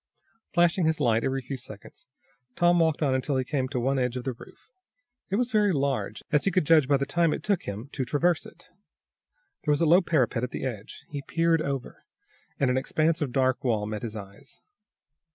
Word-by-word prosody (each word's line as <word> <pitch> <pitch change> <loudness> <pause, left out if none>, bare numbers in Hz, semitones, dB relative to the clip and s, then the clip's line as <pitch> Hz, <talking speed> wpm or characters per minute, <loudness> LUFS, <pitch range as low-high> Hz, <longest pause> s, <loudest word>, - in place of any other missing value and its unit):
Flashing 175 0 +3
his 160 -1 +1
light 115 -5 +2
every 135 0 -1
few 135 +2 -5
seconds, 110 -3 -12 0.5
Tom 175 0 +4
walked 160 -2 +2
on 135 -3 +2
until 130 +1 0
he 130 - +1
came 130 -1 -1
to 130 -1 -3
one 135 +3 +1
edge 125 0 -1
of 125 - -5
the 130 - -2
roof. 120 - -16 0.6
It 195 - 0
was 245 +3 0
very 210 -2 +3
large, 140 -4 -1
as 150 -2 +3
he - - +4
could 185 -4 +1
judge 155 -3 +5
by 140 0 +4
the 140 - -1
time 170 +1 +1
it - - -8
took 200 -4 0
him 105 +6 -6
to 135 - -2
traverse 155 +5 +1
it. 170 +2 -18 0.9
There 150 - +1
was 145 - +1
a - - +4
low 175 +4 +6
parapet 135 -9 +1
at 125 - -1
the - - -5
edge. 110 -5 -7
He 145 -1 -5
peered 165 +2 +1
over, 135 -4 -4 0.6
and 135 -2 +2
an 130 - +2
expanse 160 +4 0
of 140 -4 -1
dark 130 0 +1
wall 110 -5 0
met 105 -1 -4
his 110 -2 -5
eyes. 105 - -10
140 Hz, 215 wpm, -27 LUFS, 125-165 Hz, 0.9 s, low